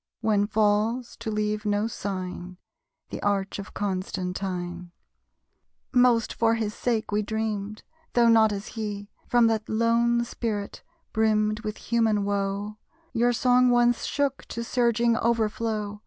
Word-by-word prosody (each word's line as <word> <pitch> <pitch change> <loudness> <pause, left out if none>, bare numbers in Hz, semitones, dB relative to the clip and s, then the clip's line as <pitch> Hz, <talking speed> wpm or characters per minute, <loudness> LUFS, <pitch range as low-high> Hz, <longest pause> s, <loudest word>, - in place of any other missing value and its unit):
When 210 -2 +2
falls, 215 +3 +1
to - - -5
leave 210 0 -1
no 205 0 +1
sign, 185 -4 -5 0.5
The - - -5
arch 200 -1 -1
of 200 - -9
Constantine. 185 -2 -3 1.0
Most 245 -3 +4
for 230 0 +2
his 215 -2 -2
sake 225 -3 -1
we 210 +1 +1
dreamed. 215 -1 -3 0.3
Tho' 240 -1 +4
not 220 -2 +5
as 200 0 -5
he, 205 -2 -5 0.2
From 240 -1 +4
that 225 -1 0
lone 235 +1 +2
spirit, 215 -4 -4 0.3
brimmed 215 -1 +2
with 215 -1 -5
human 220 -3 +1
woe, 200 +1 -2 0.3
Your 240 0 +3
song 250 +1 +4
once 240 -1 +3
shook 280 -1 -1
to 235 - -5
surging 235 -1 +2
overflow. 220 -2 -1
215 Hz, 130 wpm, -26 LUFS, 205-230 Hz, 1.0 s, not